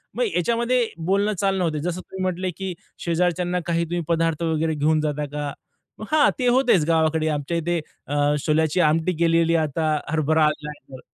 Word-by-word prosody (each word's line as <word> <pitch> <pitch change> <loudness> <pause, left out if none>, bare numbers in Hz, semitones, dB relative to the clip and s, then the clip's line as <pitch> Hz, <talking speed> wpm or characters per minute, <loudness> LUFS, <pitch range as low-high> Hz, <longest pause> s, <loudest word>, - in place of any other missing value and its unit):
मग - - +1
याच्यामध्ये 235 +5 +1 0.2
बोलणं, 200 +3 +2
चालणं 195 -2 +1
होत. 165 - +1
जसं 180 +1 -3
तुम्ही 190 +1 -9
म्हटले, 185 0 -1
की 190 -2 -4 0.3
"शेजारच्यांना 175 +1 0
काही 170 -1 0
तुम्ही 175 +1 -2
पदार्थ 165 -1 0
वगैरे 160 0 0
घेऊन 155 +1 +2
जाता 150 -1 -2
का?" 145 -1 -3 0.5
मग 215 - -6
हां, 310 -1 +5
ते 250 - +1
होतेच 245 - +4
गावाकडे 160 -1 +2
आमच्या 150 +3 -2
इथे 170 +1 -1 0.3
अ, 145 +1 +1
छोल्याची 160 +2 +2
आमटी 160 +3 +2
केलेली 165 0 +3
आहे. 160 -2 +2
आता 155 +2 -1 0.2
हरभरा 155 0 +2
आलाय 150 0 -2 0.2
तर. 130 - -8
165 Hz, 180 wpm, -23 LUFS, 155-185 Hz, 0.5 s, हां